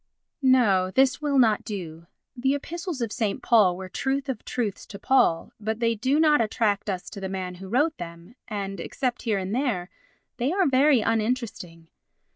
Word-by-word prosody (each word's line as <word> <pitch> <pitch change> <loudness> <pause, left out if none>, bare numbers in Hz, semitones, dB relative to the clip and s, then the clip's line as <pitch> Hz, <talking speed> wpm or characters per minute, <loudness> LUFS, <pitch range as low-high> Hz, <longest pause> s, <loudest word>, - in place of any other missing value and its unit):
No. 225 -9 +4
This 265 +6 +2
will 290 -2 +1
not 225 -5 +4
do. 170 -5 -7 0.3
The 265 +3 +1
Epistles 335 0 -5
of 230 -3 -2
St. 215 -5 -2
Paul 205 -7 +4
were 190 0 -7
truth 270 +8 -2
of 245 -5 -4
truths 220 -6 -3
to 200 - -9
Paul, 195 -9 +2
but 220 +1 -3
they 230 -1 +2
do 260 +7 +1
not 300 -4 +5
attract 215 -2 0
us 185 -2 -3
to - - -8
the 190 - -3
man 185 -1 -4
who 190 - -8
wrote 295 +8 +1
them, 170 +4 -9
and, 195 -3 -4
except 250 +7 -3
here 220 -4 0
and 190 +1 -3
there, 230 -9 -1 0.5
they 255 +4 0
are 380 +1 +2
very 270 -1 +4
uninteresting. 215 -7 -2
225 Hz, 180 wpm, -25 LUFS, 195-265 Hz, 0.5 s, not